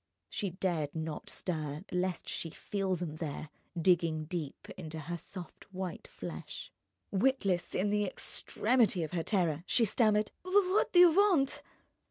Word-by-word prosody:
She 200 Hz, -, -1 dB
dared 170 Hz, -5 st, -1 dB
not 160 Hz, -1 st, -4 dB
stir 155 Hz, -3 st, -3 dB
lest 180 Hz, 0 st, -1 dB
she 165 Hz, -, -3 dB
feel 195 Hz, +3 st, -2 dB
them 165 Hz, -3 st, -4 dB
there, 155 Hz, -1 st, -5 dB, 0.3 s
digging 165 Hz, -3 st, +3 dB
deep 155 Hz, -4 st, -5 dB
into 160 Hz, -3 st, -7 dB
her 170 Hz, +4 st, -4 dB
soft 185 Hz, +2 st, -9 dB
white 185 Hz, -2 st, -5 dB
flesh. -, -, -7 dB, 0.4 s
Witless, 195 Hz, -5 st, +1 dB
in 200 Hz, +2 st, +1 dB
the 210 Hz, 0 st, +2 dB
extremity 215 Hz, 0 st, +1 dB
of 155 Hz, -, -4 dB
her 175 Hz, -2 st, 0 dB
terror, 170 Hz, -4 st, +1 dB
she 235 Hz, -, +4 dB
stammered: 215 Hz, 0 st, +3 dB
"What 375 Hz, +1 st, +3 dB
do -, -, +2 dB
you 350 Hz, -1 st, +10 dB
want?" 350 Hz, -7 st, +3 dB
185 Hz, 145 wpm, -32 LUFS, 160-210 Hz, 0.4 s, you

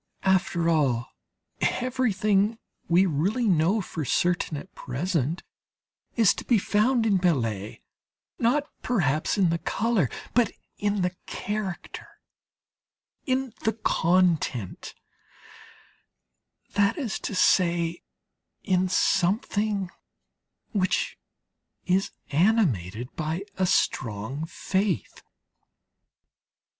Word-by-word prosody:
After 180 Hz, -3 st, +2 dB
all, 135 Hz, -7 st, +1 dB, 0.5 s
everything 220 Hz, -4 st, +1 dB, 0.3 s
we 175 Hz, +3 st, +5 dB
really 190 Hz, -, 0 dB
know 185 Hz, +4 st, +3 dB
for 165 Hz, -3 st, -5 dB
certain, 175 Hz, +1 st, 0 dB
at 185 Hz, +6 st, -10 dB
present, 150 Hz, +3 st, -2 dB, 0.7 s
is 225 Hz, -5 st, +5 dB
to -, -, -7 dB
be 240 Hz, -, +3 dB
found 225 Hz, +4 st, +2 dB
in 205 Hz, -3 st, +3 dB
Millet, 115 Hz, -, -1 dB, 0.6 s
not 250 Hz, +5 st, +2 dB, 0.2 s
perhaps 155 Hz, -, +1 dB
in 185 Hz, -4 st, +3 dB
the 170 Hz, -, 0 dB
colour, 195 Hz, -, 0 dB, 0.2 s
but 235 Hz, -4 st, +3 dB, 0.3 s
in 205 Hz, -2 st, 0 dB
the 180 Hz, 0 st, -1 dB
character, 205 Hz, -3 st, -5 dB, 1.2 s
in 260 Hz, -2 st, 0 dB
the 220 Hz, -, +2 dB
content 170 Hz, -, 0 dB, 1.8 s
that 200 Hz, -, +2 dB
is 255 Hz, -9 st, -3 dB
to 205 Hz, -, -4 dB
say, 170 Hz, -2 st, +2 dB, 0.6 s
in 185 Hz, -2 st, +1 dB
something 200 Hz, +1 st, +1 dB, 0.8 s
which 190 Hz, -4 st, 0 dB, 0.7 s
is 190 Hz, +1 st, +2 dB, 0.2 s
animated 140 Hz, -, +1 dB
by 160 Hz, +4 st, -2 dB, 0.2 s
a 185 Hz, -, +3 dB
strong 125 Hz, +3 st, 0 dB
faith.... 190 Hz, -, -2 dB
185 Hz, 90 wpm, -26 LUFS, 160-210 Hz, 1.8 s, we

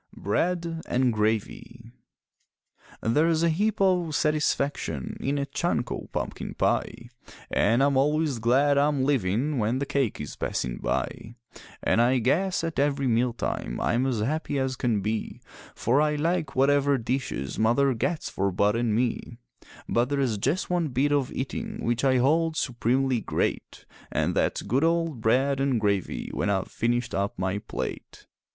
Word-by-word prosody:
BREAD 165 Hz, -, -1 dB
AND 125 Hz, -1 st, +2 dB
GRAVY 110 Hz, +2 st, -2 dB, 1.1 s
There's 160 Hz, +7 st, +2 dB
a 170 Hz, -, +4 dB
heap 205 Hz, +6 st, 0 dB
o' 180 Hz, -4 st, +2 dB
satisfaction 145 Hz, -, -1 dB
in 140 Hz, +2 st, -1 dB
a 140 Hz, -, -1 dB
chunk 140 Hz, -5 st, -1 dB
o' -, -, -5 dB
pumpkin -, -, -4 dB
pie, 120 Hz, -, -1 dB, 0.4 s
An' 115 Hz, +5 st, +3 dB
I'm 140 Hz, -1 st, +3 dB
always 150 Hz, -1 st, +1 dB
glad 140 Hz, +5 st, +3 dB
I'm 145 Hz, -2 st, +2 dB
livin' 130 Hz, +1 st, +1 dB
when 110 Hz, +3 st, +1 dB
the 140 Hz, -, -1 dB
cake 135 Hz, -5 st, -1 dB
is 75 Hz, -, -6 dB
passin' -, -, -3 dB
by; 115 Hz, +2 st, -3 dB, 0.5 s
An' -, -, +2 dB
I 125 Hz, +2 st, +4 dB
guess 165 Hz, +11 st, +1 dB
at 165 Hz, -3 st, -2 dB
every 140 Hz, -1 st, +1 dB
meal 120 Hz, 0 st, +2 dB
time -, -, -3 dB
I'm 125 Hz, +3 st, +1 dB
as 120 Hz, -5 st, -1 dB
happy 145 Hz, +4 st, -1 dB
as 130 Hz, -1 st, -1 dB
can 115 Hz, -4 st, 0 dB
be, 110 Hz, +2 st, -3 dB, 0.4 s
For 130 Hz, +6 st, +2 dB
I 150 Hz, 0 st, +2 dB
like 160 Hz, -1 st, -1 dB
whatever 140 Hz, +1 st, +3 dB
dishes 115 Hz, -, -3 dB
Mother 130 Hz, +5 st, +3 dB
gets 155 Hz, +8 st, -2 dB
for 100 Hz, 0 st, -1 dB
Bud 100 Hz, +3 st, +2 dB
an' 115 Hz, -2 st, +1 dB
me; 120 Hz, 0 st, -2 dB, 0.5 s
But 120 Hz, +2 st, +1 dB
there's 135 Hz, -7 st, 0 dB
just 145 Hz, -, 0 dB
one 175 Hz, -2 st, 0 dB
bit 135 Hz, +2 st, 0 dB
of 140 Hz, -3 st, +1 dB
eatin' 215 Hz, -, -4 dB
which 120 Hz, +2 st, 0 dB
I 130 Hz, -1 st, +4 dB
hold 160 Hz, +5 st, +2 dB
supremely 130 Hz, -1 st, +1 dB
great, -, -, -3 dB, 0.3 s
An' -, -, 0 dB
that's -, -, 0 dB
good 130 Hz, +8 st, +1 dB
old 165 Hz, -6 st, +1 dB
bread 135 Hz, +5 st, +2 dB
and 135 Hz, -3 st, +1 dB
gravy 100 Hz, -3 st, -1 dB
when -, -, -1 dB
I've 95 Hz, -2 st, 0 dB
finished 120 Hz, +1 st, -1 dB
up 100 Hz, +1 st, -1 dB
my 95 Hz, +2 st, -1 dB
plate. -, -, -6 dB
130 Hz, 160 wpm, -26 LUFS, 115-150 Hz, 1.1 s, a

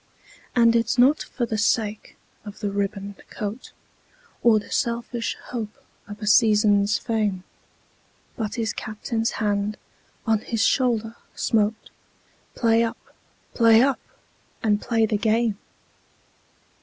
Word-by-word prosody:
And 235 Hz, -1 st, +5 dB
it's 235 Hz, +1 st, +1 dB
not 265 Hz, +5 st, +5 dB
for 240 Hz, -, -3 dB
the 220 Hz, -2 st, -3 dB
sake 210 Hz, 0 st, -1 dB, 0.3 s
of 210 Hz, +1 st, -11 dB
a 205 Hz, -, -1 dB
ribboned 200 Hz, 0 st, -3 dB
coat, 210 Hz, +3 st, -6 dB, 0.7 s
Or 230 Hz, -2 st, +5 dB
the 210 Hz, -, -6 dB
selfish 235 Hz, 0 st, -2 dB
hope 220 Hz, -4 st, -5 dB, 0.3 s
of 205 Hz, 0 st, -9 dB
a -, -, -2 dB
season's 210 Hz, -1 st, +4 dB
fame, 210 Hz, -5 st, -1 dB, 0.9 s
But 215 Hz, -2 st, -3 dB
his 225 Hz, -2 st, -1 dB
Captain's 225 Hz, +1 st, -3 dB
hand 205 Hz, -1 st, -1 dB, 0.5 s
on 220 Hz, -2 st, +2 dB
his 225 Hz, 0 st, -1 dB
shoulder 235 Hz, -3 st, +1 dB, 0.2 s
smote 215 Hz, -1 st, 0 dB, 0.6 s
"Play 230 Hz, -1 st, +3 dB
up! 230 Hz, 0 st, -2 dB, 0.6 s
play 230 Hz, 0 st, +6 dB
up! 275 Hz, -1 st, +1 dB, 0.6 s
and 210 Hz, -2 st, +2 dB
play 225 Hz, -2 st, +1 dB
the 215 Hz, -1 st, 0 dB
game!" 220 Hz, -1 st, +1 dB
220 Hz, 120 wpm, -24 LUFS, 210-230 Hz, 0.9 s, play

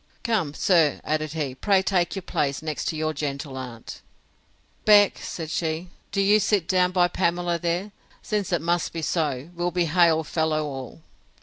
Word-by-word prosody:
Come, 190 Hz, -, 0 dB
sir, 165 Hz, -6 st, +3 dB
added 155 Hz, 0 st, -2 dB
he, 150 Hz, -5 st, -2 dB
pray 190 Hz, +7 st, +2 dB
take 180 Hz, -1 st, +1 dB
your 195 Hz, -, -5 dB
place 140 Hz, -2 st, -1 dB
next 155 Hz, +1 st, -2 dB
your 155 Hz, 0 st, -2 dB
gentle 140 Hz, -2 st, -4 dB
aunt!—Beck, 130 Hz, -, -1 dB
said 160 Hz, -2 st, -6 dB
she, 165 Hz, +2 st, -2 dB, 0.2 s
do 200 Hz, -, -1 dB
you 205 Hz, +2 st, +5 dB
sit 205 Hz, -4 st, +1 dB
down 180 Hz, -1 st, +3 dB
by 180 Hz, -1 st, +3 dB
Pamela 175 Hz, -1 st, 0 dB
there, 175 Hz, +4 st, -2 dB, 0.3 s
since 205 Hz, -3 st, -2 dB
it 175 Hz, -4 st, +1 dB
must 175 Hz, +1 st, 0 dB
be 165 Hz, -1 st, -4 dB
so; 150 Hz, -2 st, -1 dB
we'll 175 Hz, 0 st, -1 dB
be 175 Hz, 0 st, 0 dB
hail 165 Hz, -1 st, +3 dB
fellow 155 Hz, 0 st, 0 dB
all! 135 Hz, +1 st, -7 dB
170 Hz, 165 wpm, -25 LUFS, 155-180 Hz, 0.3 s, you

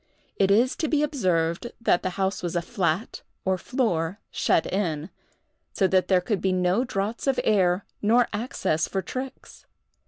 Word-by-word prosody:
It 195 Hz, -, +2 dB
is 235 Hz, +6 st, +4 dB
to 315 Hz, -, -1 dB
be 300 Hz, -1 st, +2 dB
observed 185 Hz, -, 0 dB
that 225 Hz, -6 st, +2 dB
the 185 Hz, -, -1 dB
house 195 Hz, 0 st, 0 dB
was 175 Hz, -1 st, -3 dB
a 170 Hz, -, 0 dB
flat, 180 Hz, 0 st, -1 dB, 0.2 s
or 190 Hz, 0 st, +2 dB
floor, 185 Hz, -5 st, -1 dB
shut -, -, +2 dB
in; 170 Hz, -4 st, -2 dB, 0.6 s
so 195 Hz, -, +2 dB
that 185 Hz, 0 st, +3 dB
there 185 Hz, -2 st, +4 dB
could 205 Hz, +1 st, -1 dB
be 190 Hz, -, +1 dB
no 185 Hz, +5 st, +2 dB
draughts 220 Hz, +1 st, -3 dB
of 270 Hz, -, +2 dB
air 190 Hz, -3 st, +2 dB, 0.2 s
nor 230 Hz, +3 st, +4 dB
access 205 Hz, -, -1 dB
for 190 Hz, -1 st, -2 dB
tricks. 260 Hz, +1 st, -7 dB
195 Hz, 165 wpm, -25 LUFS, 180-235 Hz, 0.6 s, is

